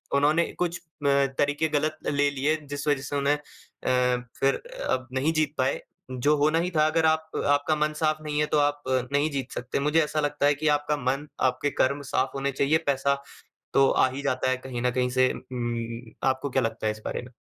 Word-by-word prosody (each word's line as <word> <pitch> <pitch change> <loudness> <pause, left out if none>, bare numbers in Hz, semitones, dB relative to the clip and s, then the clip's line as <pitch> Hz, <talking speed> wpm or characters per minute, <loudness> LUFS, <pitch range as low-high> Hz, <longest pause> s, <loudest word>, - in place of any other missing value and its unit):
उन्होंने 150 +4 +4 0.2
कुछ 175 -1 0
अ, - - -30 0.6
तरीके 145 +2 +2
गलत 155 +1 0
ले 145 0 +2
लिए, 140 +3 +1
जिस 145 +1 -4
वजह 145 -2 +2
से 135 +1 -5
उन्हें, 140 +1 +2
अ - - -16 1.0
फिर 135 0 +3 0.3
अब 130 0 0
नहीं 140 +5 +1
जीत 155 -2 +1
पाए। 130 +1 0 0.3
जो 145 +4 +2
होना 155 +3 +3
ही 180 +1 0
था, 155 -2 +3
अगर 160 +1 +2
आप 160 0 +2 0.2
आपका 145 +2 +2
मन 150 0 0
साफ़ 155 0 0
नहीं 150 -1 -2
है, 150 - +3
तो 150 - 0
आप 145 0 +1 0.3
नहीं 145 +2 +2
जीत 135 -2 -4
सकते। 125 +2 -3
मुझे 150 +3 +2
ऐसा 155 0 -2
लगता 145 -1 0
है 145 - +5
कि 155 +2 -2
आपका 150 0 -2
मन, 135 +2 -1 0.2
आपके 130 +3 0
कर्म 140 +2 +1
साफ़ 130 +1 +1
होने 140 0 -1
चाहिए, 140 +3 +2
पैसा 140 0 +2 0.6
तो 135 0 +5
आ - - +4
ही 140 +2 -6
जाता 130 -2 0
है 130 - +1
कहीं 125 -2 -6
ना 125 - +2
कहीं 125 0 0
से। 130 0 +3
उ - - -7 0.2
उम, 115 -1 -4 0.2
आपको 130 +1 -1
क्या 130 0 +1
लगता 115 -1 -2
है 105 - +2
इस 110 - -12
बारे - - -3
में? 125 0 -13
145 Hz, 220 wpm, -26 LUFS, 130-150 Hz, 1.0 s, है